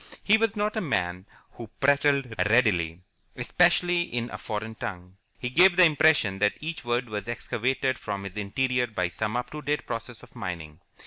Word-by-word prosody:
He 210 Hz, -, +5 dB
was 225 Hz, -1 st, +1 dB
not 210 Hz, +1 st, -1 dB
a 220 Hz, -, 0 dB
man 90 Hz, -, -2 dB, 0.2 s
who 115 Hz, -, -9 dB
prattled 140 Hz, -2 st, +2 dB, 0.2 s
readily, 90 Hz, -8 st, +2 dB, 0.3 s
especially 175 Hz, +6 st, +2 dB
in 120 Hz, -7 st, -3 dB
a -, -, -5 dB
foreign 110 Hz, +1 st, -5 dB
tongue. 90 Hz, -3 st, -7 dB, 0.2 s
He 125 Hz, -, -4 dB
gave 175 Hz, +5 st, +6 dB
the 180 Hz, -1 st, +7 dB
impression 145 Hz, -, +3 dB
that 105 Hz, 0 st, +3 dB
each 160 Hz, -2 st, -5 dB
word 120 Hz, +1 st, -1 dB
was 105 Hz, -3 st, -5 dB
excavated 130 Hz, +2 st, -1 dB
from 100 Hz, -1 st, -5 dB
his 100 Hz, 0 st, -8 dB
interior 125 Hz, +4 st, 0 dB
by 90 Hz, -6 st, -2 dB
some 110 Hz, +6 st, -3 dB
up 125 Hz, -, -4 dB
to 150 Hz, -, -6 dB
date 150 Hz, 0 st, -2 dB
process 115 Hz, 0 st, -5 dB
of -, -, -17 dB
mining. 80 Hz, -4 st, -6 dB
120 Hz, 180 wpm, -26 LUFS, 100-145 Hz, 0.3 s, the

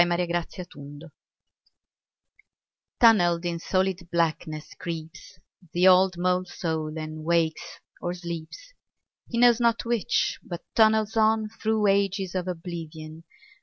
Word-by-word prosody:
L. 175 Hz, -, +4 dB
HUXLEY 175 Hz, +1 st, 0 dB
{BALLIOL) 175 Hz, +2 st, -3 dB, 0.3 s
MOLE 165 Hz, +2 st, -12 dB, 1.9 s
TUNNELLED 175 Hz, -7 st, +5 dB
in 170 Hz, -1 st, -2 dB
solid 185 Hz, -1 st, -1 dB
blackness 155 Hz, -2 st, -1 dB
creeps, 165 Hz, -2 st, -8 dB, 0.4 s
The 180 Hz, +2 st, +4 dB
old 185 Hz, -1 st, +5 dB
mole 180 Hz, +1 st, +1 dB
soul 160 Hz, -3 st, -4 dB
and 155 Hz, 0 st, -6 dB
wakes 165 Hz, -1 st, -1 dB, 0.2 s
or 175 Hz, 0 st, -3 dB
sleeps, 175 Hz, -, -8 dB, 0.6 s
He 235 Hz, -, -3 dB
knows 240 Hz, -1 st, +5 dB
not 235 Hz, -1 st, +1 dB
which, 235 Hz, -3 st, 0 dB
but 175 Hz, -2 st, -8 dB
tunnels 220 Hz, -1 st, +3 dB
on 220 Hz, -1 st, +2 dB
Through 220 Hz, -1 st, -1 dB
ages 195 Hz, -2 st, +1 dB
of 185 Hz, -1 st, -2 dB
oblivion. 165 Hz, -2 st, -7 dB
175 Hz, 125 wpm, -26 LUFS, 165-210 Hz, 1.9 s, TUNNELLED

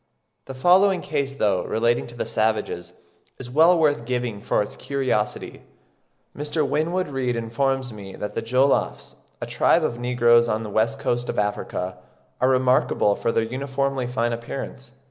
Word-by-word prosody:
The 135 Hz, -, -8 dB
following 185 Hz, +6 st, +4 dB
case, 140 Hz, -3 st, -2 dB
though 100 Hz, -8 st, +1 dB
relating 120 Hz, +1 st, 0 dB
to 120 Hz, -1 st, -5 dB
savages, 110 Hz, -5 st, -1 dB, 0.4 s
is 125 Hz, -2 st, -8 dB
well 165 Hz, +6 st, +5 dB
worth 145 Hz, -7 st, +2 dB
giving 120 Hz, -4 st, -2 dB
for -, -, +1 dB
its -, -, -9 dB
curiosity. 130 Hz, -6 st, -2 dB, 0.7 s
Mr. 150 Hz, 0 st, -1 dB
Winwood 170 Hz, +5 st, 0 dB
Reade 130 Hz, -3 st, -1 dB
informs 125 Hz, +2 st, -1 dB
me 100 Hz, -2 st, -9 dB
that 105 Hz, -, -5 dB
the -, -, -2 dB
Jollofs, 130 Hz, +4 st, +1 dB, 0.3 s
a -, -, -4 dB
tribe -, -, +2 dB
of 120 Hz, -, -2 dB
negroes 120 Hz, -1 st, +4 dB
on 110 Hz, 0 st, -1 dB
the 105 Hz, -, -6 dB
west 110 Hz, +2 st, +1 dB
coast 120 Hz, 0 st, -2 dB
of -, -, -3 dB
Africa, 105 Hz, -3 st, -2 dB, 0.4 s
"are 130 Hz, -, +4 dB
remarkable 130 Hz, -5 st, +2 dB
for 115 Hz, -, -1 dB
their 115 Hz, -, +1 dB
uniformly 135 Hz, +1 st, -2 dB
fine 120 Hz, -1 st, -1 dB
appearance." 125 Hz, +2 st, -7 dB
125 Hz, 155 wpm, -23 LUFS, 115-135 Hz, 0.7 s, well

